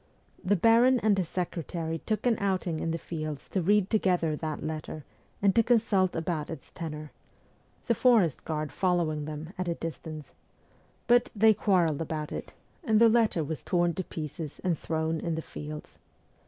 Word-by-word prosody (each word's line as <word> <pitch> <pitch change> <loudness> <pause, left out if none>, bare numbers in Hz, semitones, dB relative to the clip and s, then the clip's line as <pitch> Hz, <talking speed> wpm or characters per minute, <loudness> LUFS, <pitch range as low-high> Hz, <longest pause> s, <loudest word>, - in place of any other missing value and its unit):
The 200 +2 +3
baron 235 +6 +5
and 215 -2 +4
his 185 -4 -1
secretary 165 -2 -3
took 215 +6 -2
an 240 -2 +4
outing 185 -5 -1
in 165 - -2
the 165 - -1
fields 155 -3 -5
to 190 - 0
read 200 +2 +2
together 180 -7 +2
that 155 -1 -4
letter 155 -1 -5 0.4
and 200 -1 +5
to 230 - +5
consult 215 -5 +2
about 160 -2 -2
its 160 -5 -8
tenor 155 -2 -6 0.7
the 235 - +3
forest 225 - +3
guard 155 -2 -3
following 170 -5 0
them 155 +3 -7
at 185 - -1
a 170 - 0
distance 160 -2 -7 0.7
but 245 0 +4
they 220 +1 +6
quarrelled 180 -7 +2
about 155 -1 -4
it, - - -6 0.3
and 220 -7 +3
the 230 0 +7
letter 220 -7 +3
was 155 0 -4
torn 175 -1 +1
to 185 - -3
pieces 155 -2 -6
and 180 -3 +1
thrown 160 0 -1
in 165 -1 -2
the 160 - -3
fields. 150 0 -8
170 Hz, 170 wpm, -28 LUFS, 155-205 Hz, 0.7 s, the